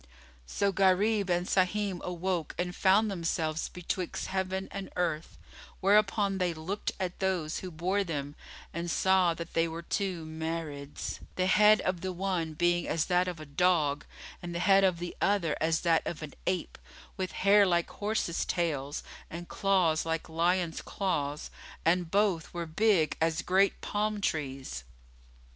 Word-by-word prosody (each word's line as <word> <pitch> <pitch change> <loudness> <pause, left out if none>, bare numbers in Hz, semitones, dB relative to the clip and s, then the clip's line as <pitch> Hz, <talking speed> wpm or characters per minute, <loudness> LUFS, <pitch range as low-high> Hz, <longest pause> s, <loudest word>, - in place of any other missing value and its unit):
So 200 - +1
Gharib 195 +2 +3
and 175 0 +1
Sahim 190 0 +1
awoke 180 -2 -2
and 180 0 -2
found 205 +3 +4
themselves 165 -3 -1
betwixt 180 0 -4
heaven 190 0 -1
and 195 -1 -5
earth; 165 -3 -2 0.4
whereupon 200 0 +3
they 175 -2 0
looked 180 +6 -3
at 185 -1 -3
those 180 -5 -1
who 185 - -6
bore 180 +5 0
them 145 -5 -4 0.4
and 170 +1 -3
saw 185 -1 +3
that 170 0 -7
they 165 0 +2
were 165 +1 -6
two 180 -3 -2
Marids, 160 -3 -5 0.2
the 185 - +1
head 210 +3 +6
of 185 -2 -1
the 190 - -2
one 180 -4 -2
being 175 +1 +2
as 160 -1 +1
that 180 0 +2
of 175 -3 -4
a 155 - -8
dog 150 -1 +2 0.4
and 175 -1 -6
the 175 - -1
head 195 -1 +6
of 185 -3 +3
the 175 +1 -5
other 190 -7 +2
as 160 0 +2
that 165 -2 +3
of 160 -2 -4
an 150 - -7
ape[FN#23] 180 -2 -1 0.4
with 185 -2 -3
hair 200 +1 +5
like 175 -3 +1
horses' 205 -5 -1
tails 145 -5 -2 0.3
and 170 +1 -7
claws 185 -5 +2
like 165 0 -2
lions' 170 +1 0
claws, 150 -7 -2 0.3
and 175 0 +2
both 195 -3 +1
were 170 -1 -2
big 170 -1 +2
as 165 +1 +1
great 190 +2 +3
palm 210 0 -1
trees. 135 - -3
175 Hz, 155 wpm, -30 LUFS, 165-190 Hz, 0.4 s, head